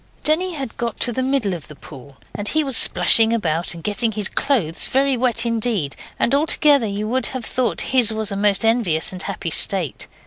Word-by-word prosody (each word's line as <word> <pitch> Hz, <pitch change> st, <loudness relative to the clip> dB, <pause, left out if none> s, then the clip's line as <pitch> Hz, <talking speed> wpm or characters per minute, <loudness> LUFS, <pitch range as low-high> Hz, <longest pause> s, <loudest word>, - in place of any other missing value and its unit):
Denny 345 Hz, +4 st, -1 dB
had 270 Hz, -6 st, -7 dB
got 235 Hz, -1 st, -5 dB
to 240 Hz, -, 0 dB
the 260 Hz, -, -3 dB
middle 260 Hz, -7 st, -1 dB
of 165 Hz, -4 st, -9 dB
the 150 Hz, -, -13 dB
pool, 140 Hz, -1 st, -15 dB, 0.2 s
and 205 Hz, 0 st, -4 dB
he 310 Hz, +6 st, 0 dB
was 270 Hz, -3 st, 0 dB
splashing 225 Hz, 0 st, +6 dB
about, 175 Hz, -7 st, -1 dB
and 165 Hz, -, -12 dB
getting 220 Hz, +2 st, -1 dB
his 210 Hz, -2 st, -1 dB
clothes 210 Hz, -, 0 dB
very 270 Hz, 0 st, 0 dB
wet 240 Hz, -1 st, 0 dB
indeed, 225 Hz, -, -2 dB, 0.2 s
and 240 Hz, -, -1 dB
altogether 290 Hz, -3 st, +2 dB
you 205 Hz, +1 st, -5 dB
would 255 Hz, +2 st, -1 dB
have 255 Hz, -3 st, -6 dB
thought 250 Hz, -4 st, -2 dB
his 250 Hz, -4 st, +2 dB
was 220 Hz, -1 st, -1 dB
a -, -, -4 dB
most 200 Hz, +1 st, 0 dB
envious 225 Hz, -9 st, 0 dB
and 185 Hz, -, -4 dB
happy 190 Hz, -4 st, -4 dB
state. 180 Hz, -2 st, +1 dB
225 Hz, 205 wpm, -19 LUFS, 195-260 Hz, 0.2 s, splashing